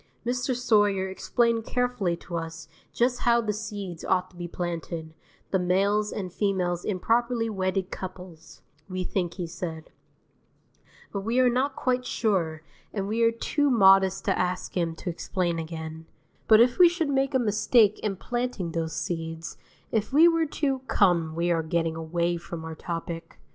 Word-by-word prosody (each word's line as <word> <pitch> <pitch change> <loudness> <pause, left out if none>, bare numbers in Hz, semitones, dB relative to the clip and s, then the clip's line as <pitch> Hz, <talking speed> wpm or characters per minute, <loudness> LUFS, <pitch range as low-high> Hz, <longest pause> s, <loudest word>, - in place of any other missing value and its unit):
Mr. 250 +1 0
Sawyer 205 -6 +2
explained 230 +4 +1
carefully 245 -9 -1
to 170 - -8
us 165 0 -5 0.2
just 245 +1 +1
how 235 0 +3
the 215 -2 -1
seeds 200 -5 -6
ought 185 0 0
to - - -21
be 175 0 -5
planted, 170 -2 -5 0.4
the 190 - +2
males 200 +4 +2
and 185 -4 -5
females 180 -4 0
in 190 -3 -2
properly 235 +1 +1
wedded 190 -1 -1
couples, 180 -3 -9 0.3
we 185 0 -2
think 175 -2 -2
he 180 - -3
said; 165 -1 -6 1.2
but 200 - -1
we 230 +5 0
are 250 -1 +5
not 265 +3 0
quite 250 -1 0
sure, 175 -11 -1 0.3
and 195 -2 -3
we 220 +3 -1
are 230 - +6
too 290 +5 0
modest 195 -4 +5
to 195 - +2
ask 180 0 -2
him 170 -2 0
to - - -11
explain 170 0 -2
again; 160 0 -6 0.4
but 220 -1 +7
if 245 +6 +4
we 355 -1 +9
should 335 -3 -1
make 270 0 +1
a - - +7
mistake 215 -1 +3
in 205 -2 -2
planting 240 -5 -3
those 165 -1 -2
seeds, 165 -1 -4 0.4
if 220 +1 0
we 310 +5 +7
were 330 -1 +2
to 275 -2 -1
Come, 170 -5 +2
we 170 +1 +1
are 165 -1 +2
getting 165 0 -1
away 170 +2 -1
from 170 -1 -7
our 160 - -5
topic. 165 0 -6
190 Hz, 170 wpm, -26 LUFS, 170-235 Hz, 1.2 s, we